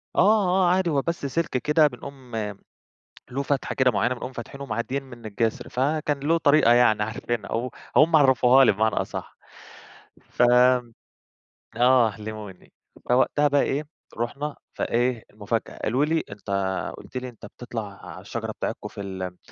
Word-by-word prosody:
آه، - - +4
آه، 190 -3 +4
عادي 185 -1 +2
هو 145 -3 +1
بس 170 0 -3
سلك 165 +4 -1
كده 150 +4 +3
بنقوم 130 -1 -10 1.0
له 135 +3 -2
فتحة 140 0 -2
كده 130 -1 +3
معينة 120 +2 0
بنقوم 125 +1 -7
فاتحينه 130 +3 -8
ومعديين 125 +3 -3
من 120 -4 -12
الجسر. 110 +1 -2
فكان 145 +2 -1
له 160 +4 +2
طريقة 145 -5 +5
يعني 120 -3 +4
عارفينها 110 0 -4
و 120 +3 -1 0.3
وهُم 160 +1 +6
عرّفوّها 130 -2 +5
لي - - +5
بمعنى 110 +2 +1
أصح، - - -4 0.9
فآه، 125 0 +4 1.3
علموني. 105 -3 -9 0.4
فوقتها 130 +4 +3
بقى 145 0 +3
إيه، 145 +3 -1 0.3
رُحنا 140 +5 -3 0.2
فإيه، 120 -1 0
المفاجأة 105 +2 -4
قالوا 130 +6 +2
لي: 160 +1 0
"أنت 100 0 -11 0.5
قُلت - - -9
لي 130 0 -4
أنت 115 -4 -13
بتطلع 110 -2 -7
على 90 +1 -9
الشجرة 110 +3 -5
بتاعتكم - - -5
في - - -8
ال 95 -2 -6
125 Hz, 150 wpm, -24 LUFS, 110-145 Hz, 1.3 s, وهُم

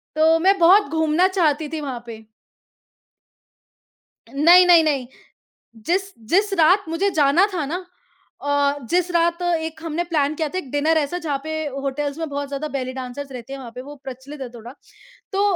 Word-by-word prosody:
तो 320 +1 +4
मैं 390 +3 +3
बहुत 350 -1 +5
घूमना 320 +3 +2
चाहती 320 -6 0
थी 320 +1 -4
वहाँ 260 -5 -5
पे। 220 -1 -10 2.0
नहीं, 335 +8 +6
नहीं, 345 -2 +6
नहीं, 280 -5 0 0.8
जिस 385 +3 0 0.2
जिस 400 +3 +2
रात 365 +5 +4
मुझे 350 +5 0
जाना 290 +7 +4
था 330 -4 -1
ना 355 +5 -5 0.6
अ, 285 0 +1
जिस 360 0 +1
रात 340 0 +1
एक 325 -2 -2
हमने 330 +1 -2
प्लान 310 -3 0
किया 310 -1 -2
था, 370 - -4
एक 280 -9 -7
डिनर 305 +3 +1
ऐसा, 305 +4 -2
जहाँ 295 -5 -2
पे 315 - -4 0.3
होटल्स 285 +2 -3
में 325 -1 -3
बहुत 285 0 -4
ज़्यादा 285 +2 -4
बेली 255 -1 -3
डांसर्स 265 +2 -7
रहते 250 +1 -9
हैं, 275 - -6
वहाँ 240 -3 -9
पे 250 - -7
वो 290 +2 -10
प्रचलित 270 +3 -9
है 260 - -5
थोड़ा। 235 0 -11 0.6
तो 390 +1 +1
310 Hz, 175 wpm, -21 LUFS, 280-345 Hz, 2.0 s, नहीं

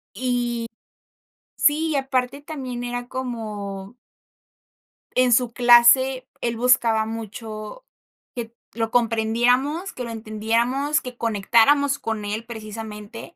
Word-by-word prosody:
Y 240 -1 -1 0.9
sí, 310 +2 +2
y 295 - 0
aparte 265 0 -1
también 260 -5 -6
era 245 0 -4
como. 215 -5 -6 1.2
En 255 -1 +4
su 245 0 +3
clase, 245 +2 +5
él 235 -1 -2
buscaba 230 -2 +3
mucho 220 - -7 0.5
que 235 -2 -6 0.2
lo 225 0 -2
comprendiéramos, 245 - +1
que 250 - -7
lo 235 - -7
entendiéramos, 230 +6 0
que 250 -1 -9
conectáramos 235 +6 +3
con 220 -2 -3
él, 215 +3 -4
precisamente 220 +3 -8
240 Hz, 110 wpm, -23 LUFS, 220-255 Hz, 1.2 s, clase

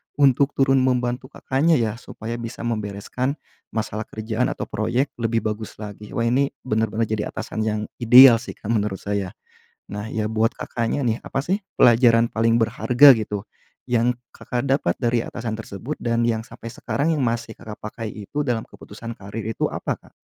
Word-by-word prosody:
untuk 140 0 +3
turun 135 0 +4
membantu 125 0 0
Kakaknya 145 +6 +1
ya, 115 -6 +1
supaya 115 0 -6
bisa 115 0 -6
membereskan 115 +4 -2 0.4
masalah 110 0 -3
kerjaan 110 +3 -2
atau - - -3
proyek, 120 +6 -1
lebih 115 0 0
bagus 110 0 -4
lagi. 105 0 -9
Wah, 115 - +1
ini 130 +4 +2 0.2
bener-bener 110 -1 0
jadi 110 -1 -2
atasan - - -6
yang 105 0 0 0.2
ideal 120 0 +9
sih, 125 - -8
Kak, 110 - -5
menurut 105 -3 0
saya. 100 -2 -3 0.6
Nah, 105 +1 -4
ya, 110 -1 -2
buat 110 +1 +1
Kakaknya 120 +4 -2
nih, 115 -1 0
apa 135 - -3
sih 190 +5 0 0.2
pelajaran 115 -1 +5
paling 115 +1 +3
berharga 125 +4 +6
gitu, 105 -3 -2 0.4
yang 120 0 +1 0.2
Kakak 125 +1 -4
dapat 135 -10 +1
dari 120 -1 +1
atasan 115 0 -5
tersebut, 115 +5 -6
dan 115 0 +1
yang 115 -1 +1
sampai 115 0 -10
sekarang 145 +5 -1
yang 155 - 0
masih 115 -2 -1
Kakak 110 -1 -10
pakai 110 +1 -5
itu, 105 +7 -5
dalam 120 -6 -1
keputusan 115 +3 -10
karier 110 +1 -6
itu - - -1
apa, - - -3
Kak? - - -21
115 Hz, 170 wpm, -23 LUFS, 110-125 Hz, 0.6 s, ideal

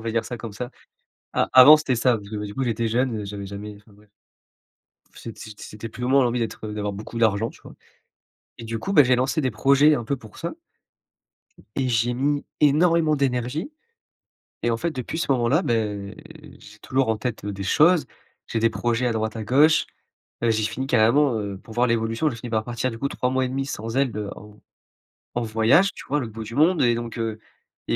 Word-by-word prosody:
va 115 0 -3
dire 115 - 0
ça 120 - -6
comme 115 -2 -8
ça. 120 +4 -6 0.6
A - - +1
avant 140 +4 +10
c'était 140 -5 -1
ça 120 0 +2
parce 100 -1 -12
que, 110 - -6
bah, 105 0 -4
du 100 - -8
coup 135 - -1
j'étais 115 -1 -1
jeune, 120 0 0
heu, - - -6
j'avais 100 0 -6
jamais 105 +1 -8
enfin 105 0 -21
bref. 105 0 -22 1.0
C'ét 115 - -10
c'ét 105 -1 -11
c'était 110 +2 -8
plus 125 - -8
ou - - 0
moins 135 0 +4
l'envie 120 0 0
d'être, 115 -1 -4
heu, 105 - -6
d'avoir 105 -1 -3
beaucoup 110 +3 -7
d'argent 110 0 +2
tu - - -20
vois? - - -13 0.8
Et - - -7
du 115 0 -4
coup, 195 - -3
bah, 145 - +8
j'ai 125 0 +3
lancé 130 +5 0
des 130 -4 0
projets 140 +7 +4
un 120 - -3
peu 140 +5 -1
pour 110 -3 -15
ça - - -4 1.2
et 130 -2 0
j'ai 120 +1 +1
mis 145 +3 0 0.2
énormément 155 +1 +4
d'énergie 135 - -1 0.9
et 120 - +1
en 115 - +1
fait 170 +8 -2
depuis 130 +3 -5
ce 165 - -2
moment-là, 130 +7 +2
beh, 105 - -2 0.4
j'ai 105 +1 -15
toujours 130 -2 0
en 110 - +1
tête, 110 -1 -4
heu, 105 - -3
des 100 0 -6
choses. 160 - +4 0.4
J'ai 115 - -1
des 115 0 +3
projets 120 +2 -1
à 120 - +1
droite, 110 0 -2
à 110 - -4
gauche. 150 +7 +4 0.6
Heu, 115 - +3
j'ai 110 -1 +1
fini 115 +5 -2
carrément, 135 +3 +3
heu, 100 -2 -5
pour 110 +2 -13
voir 120 +1 +3
l'évolution 115 +6 0
j'ai 120 - -7
fini 115 +1 -8
par 110 -1 0
partir 120 +1 -2
du 115 - -8
coup 140 +3 -1
3 125 - -2
mois 130 0 +1
et - - -2
demi 135 +1 -3
sans 115 -2 -5
elle, 135 -5 +1
heu, 105 -2 -4
en 105 0 -14 0.8
en - - 0
voyage, 115 - +3
tu - - -11
vois 145 - 0
à - - +1
l'autre 115 -3 -6
bout 110 0 -7
du 115 - -8
monde 160 +4 +3
et 120 -2 +3
donc, 120 0 -5
heu, 110 -1 -3 0.5
il - - +2
115 Hz, 230 wpm, -23 LUFS, 110-135 Hz, 1.2 s, avant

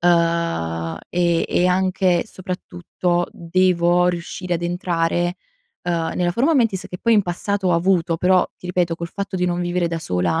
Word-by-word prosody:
Ehm, 165 - +1
e 170 -1 +2
e 180 - +2
anche 185 -1 +2
soprattutto 180 -2 -3
devo 175 0 +2
riuscire 175 +1 -2
ad 170 - -3
entrare, 175 0 0 0.5
uhm, 170 -2 -1
nella 175 -1 +1
forma 270 - +2
mentis 225 -8 +1
che 180 - -7
poi 230 -1 +3
in 205 - +5
passato 190 +2 -2
ho - - +3
avuto; 170 -1 +2
però 185 +2 +3
ti - - -11
ripeto 175 -2 0
col 170 0 -6
fatto 200 0 -5
di 180 - 0
non 175 0 0
vivere 175 0 0
da 165 0 -2
sola 90 - 0
175 Hz, 165 wpm, -21 LUFS, 170-185 Hz, 0.5 s, in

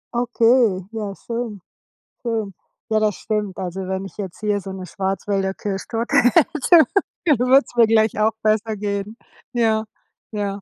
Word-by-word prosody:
Okay, 235 -5 +3
ja 210 -3 -5
schön, 230 -3 -5 0.6
schön. 220 -5 -2 0.3
Ja, 220 -1 +2
das 210 -2 +1
stimmt. 210 -3 -3
Also, 185 +1 -4
wenn 190 +1 -2
ich - - -11
jetzt 190 -4 -6
hier 205 -2 0
so 195 - -7
'ne 190 -1 -7
Schwarzwälder 195 +1 -2
Kirschtorte 210 +4 -3
hätte, 305 - +5 0.4
dann 290 -8 +3
würde 260 +3 +5
es - - -16
mir 230 -2 +6
gleich 220 -1 +3
auch 220 +1 +3
besser 215 0 +1
gehen. 205 +2 -3 0.3
Ja, 220 -2 +1 0.5
ja. 200 -1 -3
215 Hz, 155 wpm, -21 LUFS, 195-230 Hz, 0.6 s, mir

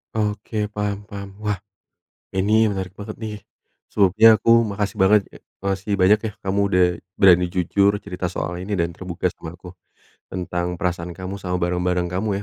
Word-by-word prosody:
Oke, 105 0 -2
paham 105 -1 -3
paham. 100 -1 -8
Wah, 105 -2 -1 0.8
ini 110 +3 +3
menarik 95 -2 -3
banget 105 +2 -8
nih, 110 -2 -6 0.5
sebelumnya 110 +3 +6
aku 115 - +1 0.2
makasih 100 +1 -3
banget 100 +2 +6
ya - - -12 0.3
makasih 100 +1 -1
banyak 100 +3 +5
ya, - - -7
kamu 95 +1 0
udah 90 -2 +4 0.3
berani 90 -2 +6
jujur 100 +3 +2
cerita 90 -2 -3
soal 90 0 -4
ini 100 +2 -3
dan 85 0 0
terbuka 90 0 -3
sama 85 +2 -9
aku. 90 0 -11 0.6
Tentang 90 -1 -3
perasaan 85 -1 -3
kamu 95 +2 -6
sama 90 -1 -3
barang-barang 90 0 0
kamu 100 +4 -1
95 Hz, 160 wpm, -22 LUFS, 90-105 Hz, 0.8 s, sebelumnya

